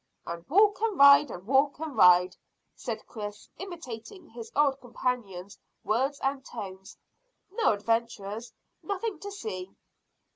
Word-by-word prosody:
"And 170 Hz, 0 st, -6 dB
walk 410 Hz, +5 st, +4 dB
and 445 Hz, -4 st, 0 dB
ride, 280 Hz, 0 st, +8 dB, 0.2 s
walk 275 Hz, +4 st, +3 dB
and 310 Hz, -2 st, -6 dB
ride," 180 Hz, 0 st, +6 dB, 0.4 s
said -, -, -6 dB
Chris, 210 Hz, -2 st, -8 dB
imitating 345 Hz, -, -8 dB
his 230 Hz, -1 st, -10 dB
old 280 Hz, -1 st, +2 dB
companion's 230 Hz, -6 st, -4 dB, 0.2 s
words 260 Hz, +8 st, 0 dB
and 270 Hz, 0 st, -1 dB
tones. 190 Hz, -6 st, -9 dB, 0.5 s
"No 430 Hz, -, +2 dB
adventures 225 Hz, 0 st, -2 dB, 0.3 s
nothing 400 Hz, -2 st, -3 dB
to 405 Hz, -, -7 dB
see." 195 Hz, -, -6 dB
245 Hz, 120 wpm, -28 LUFS, 205-300 Hz, 0.5 s, ride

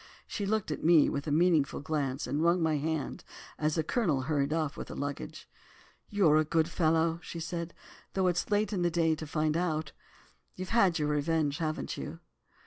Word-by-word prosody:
She 200 Hz, -, -4 dB
looked 215 Hz, -5 st, 0 dB
at -, -, -4 dB
me 165 Hz, -2 st, +6 dB
with 140 Hz, +2 st, -3 dB
a -, -, -1 dB
meaning 165 Hz, +1 st, +4 dB
glance 140 Hz, -1 st, -3 dB
and 145 Hz, +2 st, -1 dB
wrung 170 Hz, +2 st, +3 dB
my 155 Hz, -2 st, +2 dB
hand 155 Hz, 0 st, -3 dB, 0.4 s
as 155 Hz, 0 st, +1 dB
the 160 Hz, -, +1 dB
Colonel 155 Hz, -, +1 dB
hurried 140 Hz, +1 st, 0 dB
off 155 Hz, -2 st, -1 dB
with -, -, -7 dB
the -, -, -7 dB
luggage. 140 Hz, -, -5 dB, 0.6 s
'You're 180 Hz, -7 st, +4 dB
a 155 Hz, -, +4 dB
good 160 Hz, +1 st, +1 dB
fellow,' 165 Hz, -1 st, +1 dB
she 170 Hz, -, -7 dB
said, 170 Hz, 0 st, -4 dB, 0.4 s
'though 190 Hz, -1 st, +1 dB
it's 175 Hz, -1 st, 0 dB
late 210 Hz, 0 st, +1 dB
in 185 Hz, -, -1 dB
the 175 Hz, -, +3 dB
day 165 Hz, -1 st, +2 dB
to 155 Hz, 0 st, -5 dB
find 155 Hz, 0 st, 0 dB
it -, -, +2 dB
out. 155 Hz, -4 st, -1 dB, 0.6 s
You've 185 Hz, 0 st, -6 dB
had 200 Hz, -7 st, +3 dB
your 150 Hz, -2 st, 0 dB
revenge, 150 Hz, 0 st, 0 dB
haven't 155 Hz, -2 st, -3 dB
you? -, -, -6 dB
160 Hz, 200 wpm, -30 LUFS, 150-175 Hz, 0.6 s, me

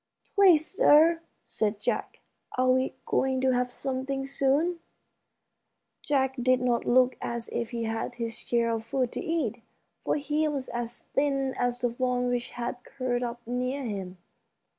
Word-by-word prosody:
"Please, 365 Hz, -7 st, +6 dB
sir," 330 Hz, -6 st, +5 dB, 0.2 s
said 210 Hz, -1 st, -1 dB
Jack, -, -, -2 dB, 0.4 s
"are 255 Hz, 0 st, +4 dB
we 260 Hz, +1 st, +1 dB
going 265 Hz, 0 st, +1 dB
to 260 Hz, 0 st, +3 dB
have 250 Hz, 0 st, 0 dB
something 270 Hz, +1 st, -2 dB
soon?" 280 Hz, +6 st, +1 dB, 1.2 s
Jack 265 Hz, -2 st, +1 dB
did 255 Hz, +1 st, +3 dB
not 245 Hz, -2 st, +1 dB
look 255 Hz, +1 st, +4 dB
as 235 Hz, -1 st, -4 dB
if 235 Hz, -1 st, -2 dB
he 235 Hz, -1 st, -3 dB
had 225 Hz, +2 st, -3 dB
his 230 Hz, -2 st, -3 dB
share 235 Hz, -1 st, +1 dB
of 225 Hz, -1 st, -2 dB
food 250 Hz, +1 st, -1 dB
to -, -, -4 dB
eat, 320 Hz, -, -1 dB, 0.4 s
for -, -, +1 dB
he 300 Hz, +1 st, 0 dB
was 280 Hz, -3 st, -3 dB
as 240 Hz, 0 st, -4 dB, 0.2 s
thin 275 Hz, -2 st, +1 dB
as 245 Hz, 0 st, -1 dB
the 245 Hz, -1 st, +1 dB
fawn 250 Hz, 0 st, 0 dB
which 245 Hz, 0 st, -1 dB
had 245 Hz, +1 st, -4 dB
curled 250 Hz, -2 st, -2 dB
up 240 Hz, -1 st, -5 dB
near 250 Hz, +3 st, -2 dB
him. 195 Hz, -5 st, -5 dB
255 Hz, 160 wpm, -28 LUFS, 240-275 Hz, 1.2 s, Please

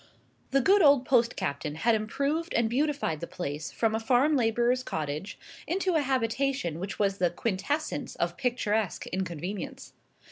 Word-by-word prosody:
The 275 Hz, 0 st, +3 dB
good 390 Hz, +9 st, +5 dB
old 280 Hz, -5 st, +6 dB
post 245 Hz, -2 st, +3 dB
captain 150 Hz, -4 st, -3 dB
had 225 Hz, +9 st, +2 dB
improved 280 Hz, +10 st, -1 dB
and 235 Hz, -1 st, +3 dB
beautified 275 Hz, -, 0 dB
the 170 Hz, -, -5 dB
place 150 Hz, -2 st, -5 dB
from 225 Hz, -1 st, 0 dB
a 220 Hz, -, 0 dB
farm 260 Hz, +6 st, +3 dB
labourer's 240 Hz, +1 st, +2 dB
cottage 155 Hz, -, -4 dB, 0.3 s
into 370 Hz, +1 st, 0 dB
a 315 Hz, -, +3 dB
habitation 260 Hz, -, 0 dB
which 195 Hz, +3 st, -5 dB
was 200 Hz, -1 st, 0 dB
the 180 Hz, -1 st, +3 dB
quintessence 255 Hz, -, -2 dB
of 170 Hz, 0 st, -1 dB
picturesque 220 Hz, -6 st, -1 dB
inconvenience. 185 Hz, +1 st, -5 dB
230 Hz, 150 wpm, -28 LUFS, 185-275 Hz, 0.3 s, old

